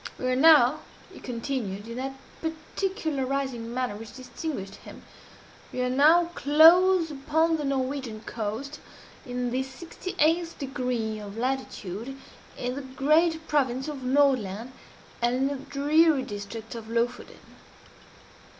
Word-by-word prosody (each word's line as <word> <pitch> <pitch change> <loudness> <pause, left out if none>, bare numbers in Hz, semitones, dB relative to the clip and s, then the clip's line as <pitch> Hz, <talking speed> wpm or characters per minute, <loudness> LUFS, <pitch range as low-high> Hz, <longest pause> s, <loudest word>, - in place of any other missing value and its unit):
"We - - -5
are - - +2
now," 295 -2 +6 0.3
he - - -11
continued, 230 -5 -4
in 230 +1 -6
that 270 +1 -4 0.3
particularizing 280 - -2
manner 250 -3 -2
which 215 0 -10
distinguished 255 - -6
him - - -13 0.7
"we - - -5
are 250 - 0
now 325 +6 +5
close 330 +4 +6
upon 320 +3 +1
the 300 - -4
Norwegian 265 -4 -2
coast 230 +7 -5 0.5
in 245 0 -2
the 255 +2 0
sixty 325 +7 -7
eighth 330 +2 +2
degree 250 -6 -2
of 205 0 -8
latitude 250 -2 -3 0.4
in 250 0 -2
the 280 - -5
great 310 +5 +1
province 265 -2 +1
of 295 -3 -5
Nordland 255 -5 +1 0.5
and 240 +1 +2
in 265 +1 +1
the 280 -1 -5
dreary 295 0 +3
district 210 +2 -7
of 225 -2 -8
Lofoden. 235 +2 -2
265 Hz, 130 wpm, -27 LUFS, 240-300 Hz, 0.7 s, now